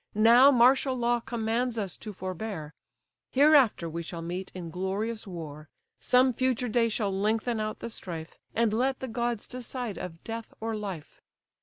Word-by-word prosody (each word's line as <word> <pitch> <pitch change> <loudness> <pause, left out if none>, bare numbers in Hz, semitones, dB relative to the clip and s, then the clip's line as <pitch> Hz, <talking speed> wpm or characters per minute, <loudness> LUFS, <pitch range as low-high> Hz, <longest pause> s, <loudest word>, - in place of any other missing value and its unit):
Now 235 +5 +7
martial 260 +1 +4
law 240 0 +2
commands 235 +1 -1
us 200 -5 -3
to 215 - -7
forbear; 185 -4 -5 0.6
Hereafter 275 - +5
we 165 +1 -4
shall 165 0 -6
meet 180 +3 -5
in 170 -3 -6
glorious 205 +5 -3
war, 155 -4 -8 0.3
Some 255 +1 +4
future 250 0 0
day 230 +1 +2
shall 210 -2 -1
lengthen 220 +4 0
out 215 0 -3
the - - -4
strife, 165 -6 -7 0.2
And 230 -2 +2
let 260 +4 +1
the 260 - -4
gods 235 -1 -2
decide 250 -3 -5
of 165 -2 -7
death 225 0 -6
or 225 0 -2
life! 195 -7 -7
220 Hz, 160 wpm, -28 LUFS, 185-240 Hz, 0.6 s, Now